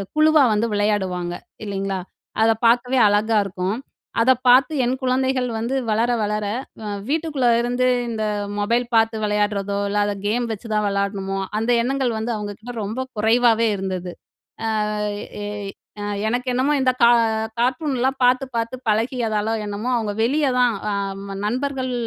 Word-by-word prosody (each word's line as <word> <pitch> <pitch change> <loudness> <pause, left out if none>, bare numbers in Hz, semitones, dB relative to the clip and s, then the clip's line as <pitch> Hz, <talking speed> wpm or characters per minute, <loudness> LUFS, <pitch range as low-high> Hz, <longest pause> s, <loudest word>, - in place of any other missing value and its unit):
குழுவா 310 -1 +5
வந்து 210 +2 +1
விளையாடுவாங்க, 190 -4 0 0.3
இல்லைங்களா? 195 -1 -2 0.4
அத 225 - +5 0.2
பார்க்கவே 245 +2 +3
அழகா 210 +2 +2
இருக்கும். 190 +2 -2 0.4
அத 260 +3 +5 0.2
பார்த்து 260 +5 +6
என் 255 +2 +1
குழந்தைகள் 260 0 +1
வந்து 235 +4 -2
வளர 230 +3 +2
வளர 210 0 -1 0.4
வ - - -7 0.2
வீட்டுக்குள்ள 300 -5 0
இருந்து 245 +1 +1 0.2
இந்த 220 -1 -2 0.4
மொபைல் 235 +4 +1
பாத்து 225 0 +3
விளையாடுறதோ, 205 -1 0
இல்ல 205 - -1
அத 205 - -1
கேம் 235 +4 +1
வச்சு 220 +2 -6
தான் 210 -1 +1
விளையாடணுமோ, 200 -1 -1 0.2
அந்த 230 +2 0
எண்ணங்கள் 260 0 0
வந்து 225 +2 -2
அவங்க 210 -1 -4
கிட்ட 245 +2 -8
ரொம்ப 220 +6 -3 0.2
குறைவாவே 230 +1 +4
இருந்தது. 185 -2 -4 0.9
அ - - -3 0.5
எ - - -4 0.5
அ - - -3 0.2
எனக்கு 245 +3 -1
என்னமோ 265 +4 +2
இந்த 255 -1 +3
கா 235 - +8 0.5
கார்ட்டூன்லாம் 260 +1 0
பார்த்து 255 +2 +4
பார்த்து 230 +2 -2
பழகியதாலோ 220 -1 0
என்னமோ 205 +4 -4
அவங்க 215 -3 -1
வெளிய 285 +5 +2
தான் 245 -3 +3 0.2
அம் 195 0 -4
நண்பர்கள் 260 +2 -2
225 Hz, 145 wpm, -22 LUFS, 205-255 Hz, 0.9 s, கா